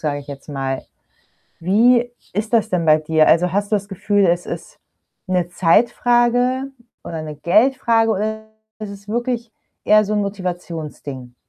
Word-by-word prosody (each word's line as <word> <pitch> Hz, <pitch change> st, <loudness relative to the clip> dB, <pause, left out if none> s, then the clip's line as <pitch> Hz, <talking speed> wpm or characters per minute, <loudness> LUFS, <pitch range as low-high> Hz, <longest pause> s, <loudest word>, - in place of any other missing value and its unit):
sage 145 Hz, -2 st, -2 dB
ich 140 Hz, -, -15 dB
jetzt 140 Hz, +1 st, -10 dB
mal. 135 Hz, -2 st, -3 dB, 0.8 s
Wie 235 Hz, +7 st, +3 dB, 0.2 s
ist 210 Hz, +4 st, -3 dB
das 225 Hz, -2 st, +2 dB
denn 180 Hz, -2 st, 0 dB
bei 155 Hz, 0 st, +6 dB
dir? 155 Hz, 0 st, +2 dB
Also, 175 Hz, +1 st, +3 dB
hast 200 Hz, +1 st, -1 dB
du 215 Hz, -, +3 dB
das 200 Hz, 0 st, -6 dB
Gefühl, 200 Hz, 0 st, +1 dB
es 175 Hz, 0 st, +1 dB
ist -, -, -7 dB, 0.5 s
'ne 180 Hz, -2 st, 0 dB
Zeitfrage, 240 Hz, +7 st, +2 dB, 0.4 s
oder 165 Hz, -2 st, -5 dB
'ne 155 Hz, -1 st, -7 dB
Geldfrage, 225 Hz, -, +3 dB
oder 220 Hz, +2 st, -2 dB, 0.3 s
ist 215 Hz, -2 st, -6 dB
es 200 Hz, 0 st, -12 dB
wirklich, 235 Hz, 0 st, -2 dB, 0.3 s
eher 215 Hz, 0 st, +5 dB
so 210 Hz, +1 st, -2 dB
'n 210 Hz, -, +1 dB
Motivationsding? 165 Hz, -9 st, -6 dB
200 Hz, 155 wpm, -20 LUFS, 165-225 Hz, 0.8 s, bei